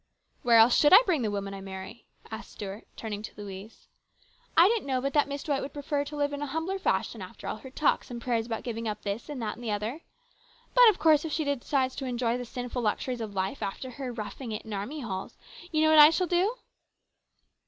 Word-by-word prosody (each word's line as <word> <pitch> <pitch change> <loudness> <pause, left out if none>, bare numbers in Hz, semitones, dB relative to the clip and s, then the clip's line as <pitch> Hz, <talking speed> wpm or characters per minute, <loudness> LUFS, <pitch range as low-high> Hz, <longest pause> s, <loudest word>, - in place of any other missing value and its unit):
" - - -42
Where 235 -1 +5
else 225 +2 +7
should 295 - +5
I 430 +6 +10
bring 335 -8 +1
the 220 - 0
woman 200 -1 -3
I 195 - -7
marry? 190 +4 -9
" - - -22
asked 220 +1 -8
Stuart, 205 +1 -7
turning 210 -2 -5
to 215 - -8
Louise. 200 +1 -9 0.3
" 485 0 -33
I 335 +3 +9
didn't 445 -7 0
know 260 -1 +1
but 275 +1 -2
that 295 -2 +3
Miss 280 0 -5
D 300 - -4
wight 275 - +1
would 275 - -6
prefer 285 0 -1
to 295 - -7
live 290 0 0
in 285 - -4
a 290 - -2
humbler 325 +7 -2
fashion - - -1
after - - -10
all - - -3
her 265 - -11
talks 280 +2 +1
and 240 -1 -5
prayers 235 -1 -1
about 225 -2 -4
giving 230 -1 -4
up 210 - -4
this 205 +7 -4
and 290 -3 -5
that 215 - -2
and 240 - -12
the 230 - -3
other. 215 +9 -3 0.7
But - - +8
of 410 - +1
course 310 -2 +4
if 320 - -4
she 315 - 0
decides 275 -2 0
to 270 - -3
enjoy 245 -1 -1
the 245 - -5
sinful 245 +1 -4
luxuries 240 +3 -1
of 210 -3 -6
life 190 +7 -2
after 255 +6 -4
her 255 0 -5
roughing 230 +2 -6
it 215 - -4
in 220 - -7
army 240 +10 -4
halls, 190 -6 -5 0.3
you 310 -1 +2
know 315 - +5
what 310 - +7
I 300 0 +11
shall 365 +3 +1
do 365 +6 +1
250 Hz, 250 wpm, -28 LUFS, 220-295 Hz, 0.7 s, I